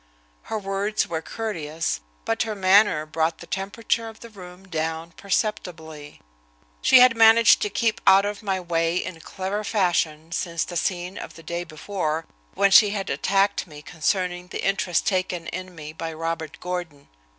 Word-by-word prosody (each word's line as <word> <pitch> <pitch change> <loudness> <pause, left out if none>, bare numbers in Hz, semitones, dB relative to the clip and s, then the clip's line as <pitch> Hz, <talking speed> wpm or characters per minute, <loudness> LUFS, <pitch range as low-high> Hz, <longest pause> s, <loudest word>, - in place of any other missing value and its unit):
Her 220 - -1
words 200 +1 -1
were 160 -1 -3
courteous, 160 - -3 0.2
but 225 - 0
her 220 -1 -1
manner 190 -4 +4
brought 160 +1 -1
the - - -11
temperature 225 +4 -2
of 220 - -15
the 235 - -11
room 185 -1 -12
down 160 -1 -3
perceptibly. 165 -7 -4 0.6
She 255 - +7
had 250 -2 +7
managed 230 0 +6
to 210 - 0
keep 225 +1 0
out 195 +1 +7
of 205 +1 -4
my 195 -3 -1
way 165 -1 0
in 180 -2 -4
clever 195 +4 -4
fashion 170 -6 0
since 170 -1 -1
the 175 - -7
scene 180 +1 -2
of - - -9
the 165 - -13
day 170 +2 -4
before, 160 0 -3 0.3
when 200 - +3
she 205 +1 +8
had 200 -1 -3
attacked 195 -1 +1
me 150 -2 -12
concerning 180 +2 -1
the - - -6
interest 190 -4 +1
taken 185 -3 -1
in 185 +2 -6
me 155 -1 -8
by 165 0 -5
Robert 165 -1 -4
Gordon. 175 -5 -5
180 Hz, 165 wpm, -24 LUFS, 165-200 Hz, 0.6 s, she